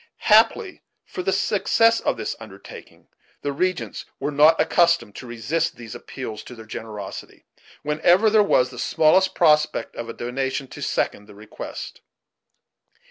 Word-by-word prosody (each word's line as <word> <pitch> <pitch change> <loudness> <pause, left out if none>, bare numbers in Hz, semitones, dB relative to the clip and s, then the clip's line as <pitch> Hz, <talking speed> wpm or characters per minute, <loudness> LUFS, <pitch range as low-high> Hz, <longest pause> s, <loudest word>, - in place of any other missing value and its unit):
Happily 230 - +3 0.2
for - - -6
the 190 - 0
success 215 +3 +2
of - - -1
this - - -4
undertaking, - - -13 0.4
the 145 - -1
regents 185 +5 -2 0.2
were 140 +2 -2
not 150 +3 +5
accustomed 170 - +2
to 130 - -9
resist 155 +9 -2
these 115 -2 -10
appeals 110 -5 -7
to 125 - -10
their 110 -1 -12
generosity, 105 -3 -8 0.4
whenever 165 +7 +3
there 215 0 +5
was 130 -11 +2
the 125 - -10
smallest 185 +7 +3
prospect 155 -2 +2
of 115 0 -6
a - - -5
donation 130 +3 -3
to - - -10
second 105 - -2
the 105 - -14
request. 105 +1 -9
150 Hz, 145 wpm, -23 LUFS, 120-180 Hz, 0.4 s, not